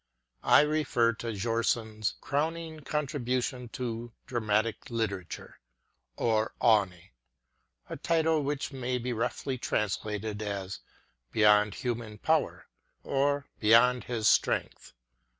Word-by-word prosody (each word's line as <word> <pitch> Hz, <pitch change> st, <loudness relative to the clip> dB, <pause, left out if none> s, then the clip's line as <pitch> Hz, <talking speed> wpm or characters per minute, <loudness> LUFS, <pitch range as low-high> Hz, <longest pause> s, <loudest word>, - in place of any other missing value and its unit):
I -, -, +6 dB
refer 150 Hz, -6 st, +2 dB
to 115 Hz, +2 st, -7 dB
Bjornson 110 Hz, 0 st, -1 dB
's -, -, +1 dB
crowning 160 Hz, +2 st, -2 dB
contribution 130 Hz, -4 st, -2 dB
to 120 Hz, -1 st, -4 dB
dramatic 110 Hz, 0 st, -1 dB
literature, 105 Hz, -7 st, -4 dB, 0.6 s
Over 110 Hz, -1 st, +1 dB
Aevne 110 Hz, -5 st, +4 dB
ŌĆö 85 Hz, -2 st, -18 dB, 0.8 s
a -, -, -6 dB
title 160 Hz, -1 st, +2 dB
which 140 Hz, +1 st, -2 dB
may 130 Hz, -1 st, -2 dB
be 125 Hz, 0 st, -3 dB
roughly 125 Hz, +3 st, -2 dB
translated 105 Hz, 0 st, -2 dB
as 100 Hz, -2 st, -4 dB, 0.5 s
Beyond 105 Hz, -1 st, +4 dB
Human 115 Hz, -3 st, -4 dB
Power 160 Hz, +7 st, 0 dB, 0.4 s
or 140 Hz, +1 st, +1 dB
Beyond 120 Hz, +3 st, +5 dB
His 115 Hz, -3 st, 0 dB
Strength. -, -, +1 dB
115 Hz, 110 wpm, -29 LUFS, 110-135 Hz, 0.8 s, I